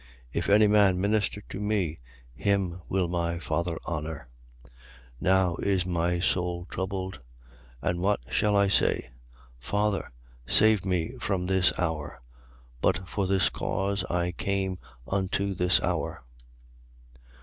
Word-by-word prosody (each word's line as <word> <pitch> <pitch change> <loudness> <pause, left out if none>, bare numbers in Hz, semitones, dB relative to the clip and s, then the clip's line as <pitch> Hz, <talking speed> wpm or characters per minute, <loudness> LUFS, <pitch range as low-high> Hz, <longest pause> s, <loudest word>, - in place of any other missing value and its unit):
If - - -1
any 105 +2 +6
man 100 -3 +4
minister 105 +1 0
to - - -6
me, 100 -6 -1 0.3
him 95 +2 0
will 95 -2 +1
my 85 -1 -1
Father 85 0 -2
honour. 75 -5 -4 0.4
12:27. - - -19 0.5
Now 95 -2 +3
is 95 -3 +1
my 85 0 0
soul 90 -1 0
troubled. 95 0 -3 0.6
And 85 +2 0
what 100 +3 +2
shall 105 +7 +2
I 100 0 +4
say? 95 -9 +1 0.5
Father, 100 +9 -1 0.4
save 110 - +4
me 90 -3 0
from 95 -3 -1
this 95 -1 +3
hour. 80 -4 -2 0.6
But 95 0 +1
for 95 +2 -1
this 95 0 +3
cause 100 0 -1
I 90 0 0
came 95 0 -2 0.3
unto 100 +1 0
this 90 0 +3
hour. - - -2
95 Hz, 125 wpm, -28 LUFS, 85-100 Hz, 0.6 s, any